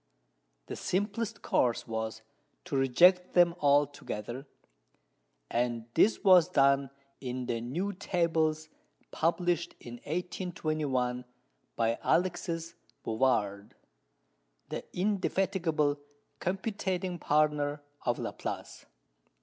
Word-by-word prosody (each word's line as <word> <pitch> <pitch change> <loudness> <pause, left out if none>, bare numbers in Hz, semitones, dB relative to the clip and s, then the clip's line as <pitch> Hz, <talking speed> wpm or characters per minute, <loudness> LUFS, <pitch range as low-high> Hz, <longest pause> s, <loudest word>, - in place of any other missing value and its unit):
The - - -6
simplest 205 +4 -2
course 120 -2 +1
was 110 0 -4 0.4
to 170 -5 -4
reject 175 +8 +4
them 175 -1 +6
altogether, 140 - 0 1.0
and 120 -1 -1
this 220 - +3
was 180 -4 +7
done 140 -3 +3 0.3
in 125 -1 -4
the 115 -2 -2
new 175 +12 -2
Tables 160 -5 0 0.4
published 175 +1 0
in 120 0 -9
1821 155 -6 -2 0.5
by 115 0 +1
Alexis 170 -2 0 0.3
Bouvard, 105 -4 0 0.9
the - - -4
indefatigable 185 -6 0 0.4
computating 190 -2 -2
partner 150 -1 +1 0.2
of 120 - 0
Laplace. - - -6
155 Hz, 85 wpm, -30 LUFS, 125-180 Hz, 1.0 s, was